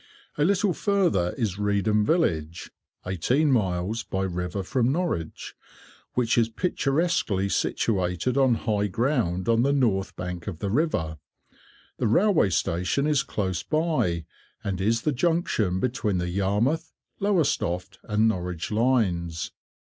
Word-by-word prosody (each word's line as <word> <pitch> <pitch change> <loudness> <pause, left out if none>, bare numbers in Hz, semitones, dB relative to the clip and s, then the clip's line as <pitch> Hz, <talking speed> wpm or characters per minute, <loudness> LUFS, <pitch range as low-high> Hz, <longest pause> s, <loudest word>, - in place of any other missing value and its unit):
A 145 - +1
little 195 +2 +2
further 175 - +1
is 105 -6 -2
Reedham 105 +1 +2
village 85 - 0 0.3
(eighteen 125 - +1
miles), 100 -1 0 2.1
which 120 -2 +1
is 115 -1 +2
picturesquely 140 - 0
situated 95 +3 0
on 135 -3 +4
high 105 -2 0
ground 105 - 0
on 115 0 +3
the 140 +3 +2
north 115 -9 +1
bank 90 -1 -6
of 95 -6 -4
the 100 +3 -3
river. 95 - 0 0.8
The - - +1
railway 175 - +3
station 90 - 0
is 150 -3 +3
close 95 -4 -2
by, 155 - 0 0.4
and 95 -2 -2
is 115 +3 +1
the 150 - +2
junction 130 - +1
between 115 -4 -1
the 90 0 -2
Yarmouth, 105 - 0 0.3
Lowestoft, 115 - 0
and 110 0 +1
Norwich 90 -4 -2
lines. 100 -9 0
105 Hz, 120 wpm, -26 LUFS, 90-140 Hz, 2.1 s, on